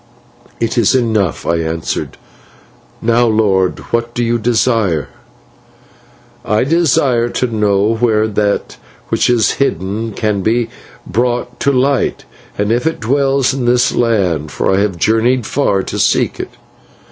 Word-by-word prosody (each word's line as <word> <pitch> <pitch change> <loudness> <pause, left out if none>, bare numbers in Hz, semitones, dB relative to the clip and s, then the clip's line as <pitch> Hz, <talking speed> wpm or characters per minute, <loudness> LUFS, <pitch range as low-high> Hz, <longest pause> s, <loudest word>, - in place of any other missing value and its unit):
"'It 115 +1 0
is 115 +3 +3
enough,' 110 - 0
I 85 - +1
answered. 80 0 -3 0.9
'Now, 120 +1 +3
lord, 100 -4 +1 0.2
what 115 0 -1
do 120 - 0
you 120 0 0
desire?' 110 - +1 1.3
"'I 105 +1 +1
desire 135 -6 +2
to 125 - -1
know 105 +1 +1
where 110 -2 +2
that 105 -1 -1 0.3
which - - +1
is 115 -3 +3
hidden 110 -1 -1
can 105 -1 -1
be 115 +3 0 0.4
brought 120 +2 -2
to 140 - +2
light, 135 +1 0 0.3
and 105 +1 0
if 120 +6 +1
it 160 - -2
dwells 135 +2 +1
in 130 -2 -2
this 125 +2 +3
land, 90 -11 0
for - - 0
I - - +2
have 100 -3 0
journeyed 115 +5 +1
far 100 -9 0
to - - -5
seek - - +1
it.' - - -4
115 Hz, 140 wpm, -15 LUFS, 100-120 Hz, 1.3 s, is